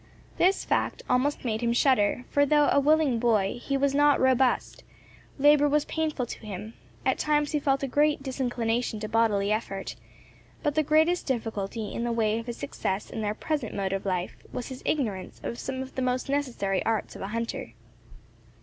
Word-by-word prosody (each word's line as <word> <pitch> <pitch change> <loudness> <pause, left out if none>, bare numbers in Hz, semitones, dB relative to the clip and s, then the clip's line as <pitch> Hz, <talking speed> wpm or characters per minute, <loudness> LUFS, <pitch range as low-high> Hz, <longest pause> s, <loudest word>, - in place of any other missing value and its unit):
This 375 +2 +3
fact - - -1
almost 260 +3 +1
made 220 -1 -1
him 235 -1 +1
shudder, 245 -2 +2
for 285 - +4
though 295 +1 +4
a - - +5
willing 290 -4 +3
boy, 225 -2 +1
he 275 +2 -1
was 275 0 +1
not 290 0 +4
robust; 260 -1 +2 0.5
labour 290 +1 +5
was 295 0 +2
painful 310 -5 -1
to - - -8
him; 210 +1 -7 0.3
at 260 - +1
times 295 -1 +1
he 300 - +1
felt 275 -1 +1
a - - 0
great 295 +1 +2
disinclination 245 -4 -1
to 215 - -3
bodily 210 -2 +2
effort, 200 -3 -3 0.7
but 295 -2 +1
the 310 - +3
greatest 315 +4 +2
difficulty 220 -4 -3
in 235 - -3
the 240 - -1
way 225 -1 +1
of 230 - -9
his 240 - -5
success 190 +2 -3
in 220 - -4
their 210 0 -1
present 290 -3 -3
mode 195 -1 -1
of 195 - -2
life, 180 -2 -2
was 245 - -5
his 260 -1 -8
ignorance 210 -11 -2
of 235 - -4
some 265 0 -4
of 265 - -11
the 260 - -3
most 255 +1 -1
necessary 240 -9 -1
arts 225 -2 -1
of - - -9
a 195 - -3
hunter. 230 +2 -4
250 Hz, 190 wpm, -27 LUFS, 220-285 Hz, 0.7 s, a